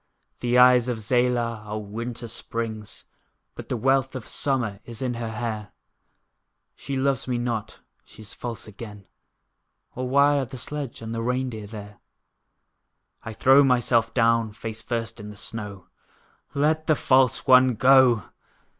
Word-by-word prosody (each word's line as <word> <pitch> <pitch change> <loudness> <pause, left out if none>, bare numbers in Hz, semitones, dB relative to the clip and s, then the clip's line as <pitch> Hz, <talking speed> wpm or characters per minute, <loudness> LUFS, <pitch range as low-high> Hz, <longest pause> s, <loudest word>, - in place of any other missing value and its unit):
The 120 0 +1
eyes 125 -1 +6
of 125 -2 -1
Zela 120 0 0
are 105 +1 -5
winter 115 +3 -6
springs! 110 -2 -5 0.5
But - - -10
the 125 - -1
wealth 135 +2 +1
of 130 - -6
summer 120 -8 -1
is 115 -2 -9
in 125 -2 -2
her 115 -1 -4
hair; 110 -2 -4
But - - -37 1.0
she 140 -1 -5
loves 135 -2 0
me 125 -1 -1
not, 115 -3 -3 0.3
she 110 - -15
is 105 - -8
false 120 -2 -6
again, 105 -1 -10 0.9
Or 125 0 -4
why 140 +2 +4
are 135 - -1
the 130 +1 -9
sledge 140 -1 -6
and 115 0 -5
the 115 - -3
rein 125 +2 -1
deer 110 -2 -7
there? 105 -1 -10 1.2
I 110 - -7
throw 135 +5 +5
myself 120 -3 +2
down, 115 -2 +2
face 110 0 -6
first 115 -1 -4
in 105 0 -8
the 105 - -11
snow: 100 -4 -7 0.7
"Let 155 +2 +1
the 155 - +4
false 130 -2 +3
one 130 -2 +6
go!" 130 -2 +5
120 Hz, 155 wpm, -24 LUFS, 110-130 Hz, 1.2 s, eyes